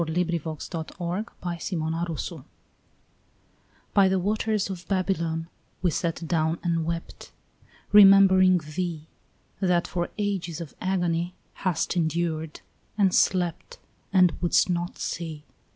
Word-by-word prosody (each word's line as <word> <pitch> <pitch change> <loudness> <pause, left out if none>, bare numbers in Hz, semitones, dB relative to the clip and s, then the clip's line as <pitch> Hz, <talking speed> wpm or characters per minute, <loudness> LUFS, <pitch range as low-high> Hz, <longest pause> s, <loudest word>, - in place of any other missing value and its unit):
SUPER 160 -1 -2 0.3
FLUMINA 170 +4 -5 0.2
BABYLONIS 170 -1 -3 1.6
BY 195 -2 +5
the 190 - +2
waters 210 +2 0
of 180 -2 -8
Babylon 170 -4 -1 0.4
we 175 - +3
sat 165 0 -2
down 160 0 +1
and 165 -2 0
wept, 170 0 -5 0.6
Remembering 195 -2 +7
thee, 160 0 -4 0.5
That 180 -3 +2
for 175 -1 -2
ages 190 -6 -2
of 165 -4 -7
agony 175 -2 -1 0.2
hast 185 -3 -1
endured, 160 -1 -1 0.4
and 195 -3 +3
slept, 180 -3 +1 0.3
And 185 -3 +5
wouldst 175 +1 +3
not 175 0 -2
see. 160 -3 -5
175 Hz, 105 wpm, -26 LUFS, 165-185 Hz, 1.6 s, Remembering